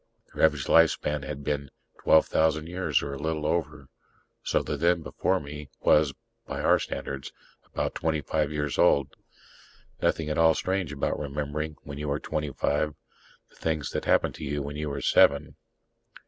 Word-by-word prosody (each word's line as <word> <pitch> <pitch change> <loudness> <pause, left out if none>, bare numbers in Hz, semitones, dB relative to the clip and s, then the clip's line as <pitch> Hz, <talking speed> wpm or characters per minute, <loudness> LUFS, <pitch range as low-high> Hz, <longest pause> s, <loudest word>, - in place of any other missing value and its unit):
Their - - -2
average 75 -4 +1
lifespan 75 -3 +3
had 70 0 -6
been 70 -1 -2 0.3
12,000 80 0 +3
years 90 +2 0
or 70 - -4
a 70 - -6
little 80 0 -2
over. 75 -4 -2 0.6
So - - +1
the - - -3
Zen 85 0 +2
before 65 - 0
me 75 0 -8
was, 75 -2 +4 0.4
by - - -4
our - - +4
standards, 70 -1 -5 0.4
about - - -2
twenty 80 -2 -1
five 75 +1 -1
years 75 -1 -2
old. 70 -1 +3 0.9
Nothing 80 - +1
at 75 - -1
all 80 -1 +5
strange 95 -4 -1
about 70 -2 -2
remembering, 75 +2 -3
when 70 0 -7
you 75 0 -3
are 70 +1 0
twenty 75 -2 -3
five, 75 +3 0 0.6
the - - -23
things 80 -2 -2
that - - -3
happened - - +3
to - - -8
you 75 0 -2
when 70 +1 -6
you 75 0 -3
were 70 - -4
seven - - +4
75 Hz, 170 wpm, -27 LUFS, 70-80 Hz, 0.9 s, all